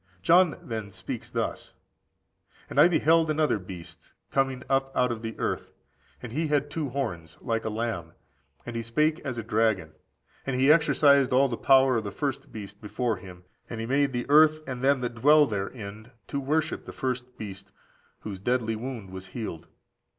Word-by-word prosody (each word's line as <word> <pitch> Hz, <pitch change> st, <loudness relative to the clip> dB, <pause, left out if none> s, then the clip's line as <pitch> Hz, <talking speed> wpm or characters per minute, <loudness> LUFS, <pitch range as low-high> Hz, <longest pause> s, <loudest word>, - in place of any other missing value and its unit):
John 175 Hz, -, +5 dB
then 110 Hz, -3 st, -5 dB
speaks -, -, -6 dB
thus: -, -, -3 dB, 1.0 s
"And -, -, +1 dB
I -, -, +9 dB
beheld 165 Hz, -1 st, +3 dB
another 155 Hz, -7 st, +2 dB
beast 90 Hz, -2 st, -11 dB, 0.2 s
coming 135 Hz, -1 st, 0 dB
up 135 Hz, 0 st, +1 dB
out 125 Hz, -1 st, +3 dB
of 115 Hz, -2 st, -4 dB
the 115 Hz, -1 st, -6 dB
earth; -, -, -3 dB, 0.5 s
and 120 Hz, -, -6 dB
he 155 Hz, +6 st, -1 dB
had 145 Hz, -1 st, 0 dB
two 150 Hz, -2 st, -2 dB
horns, 90 Hz, -, -4 dB
like 115 Hz, -2 st, -2 dB
a -, -, 0 dB
lamb, 110 Hz, -7 st, -3 dB, 0.5 s
and 120 Hz, -, -6 dB
he 115 Hz, -, -1 dB
spake 150 Hz, +8 st, +1 dB
as 130 Hz, -4 st, -5 dB
a 115 Hz, -, -3 dB
dragon. 105 Hz, -7 st, +1 dB, 0.5 s
And 135 Hz, -, -2 dB
he 135 Hz, +3 st, +5 dB
exercised 145 Hz, -3 st, +5 dB
all 135 Hz, +2 st, +4 dB
the 120 Hz, -, -2 dB
power 130 Hz, 0 st, +5 dB
of 110 Hz, -, -1 dB
the 100 Hz, -, -4 dB
first 140 Hz, +6 st, -4 dB
beast 100 Hz, -2 st, -9 dB
before 115 Hz, +2 st, -1 dB
him; 90 Hz, -1 st, -12 dB, 0.3 s
and 115 Hz, -, -5 dB
he 115 Hz, -, -3 dB
made 140 Hz, +3 st, +2 dB
the 120 Hz, -1 st, -2 dB
earth 155 Hz, +1 st, +5 dB
and 125 Hz, -2 st, -5 dB
them 135 Hz, 0 st, +3 dB
which 120 Hz, -1 st, -2 dB
dwell 150 Hz, +6 st, +6 dB
therein 105 Hz, 0 st, -5 dB, 0.2 s
to 140 Hz, -, -2 dB
worship 155 Hz, +4 st, -1 dB
the -, -, -8 dB
first 125 Hz, -1 st, -4 dB
beast, 95 Hz, -2 st, -8 dB, 0.5 s
whose 100 Hz, -3 st, -6 dB
deadly 115 Hz, +1 st, 0 dB
wound 115 Hz, -4 st, -6 dB
was 95 Hz, 0 st, -8 dB
healed. 95 Hz, -5 st, -6 dB
125 Hz, 180 wpm, -27 LUFS, 110-140 Hz, 1.0 s, I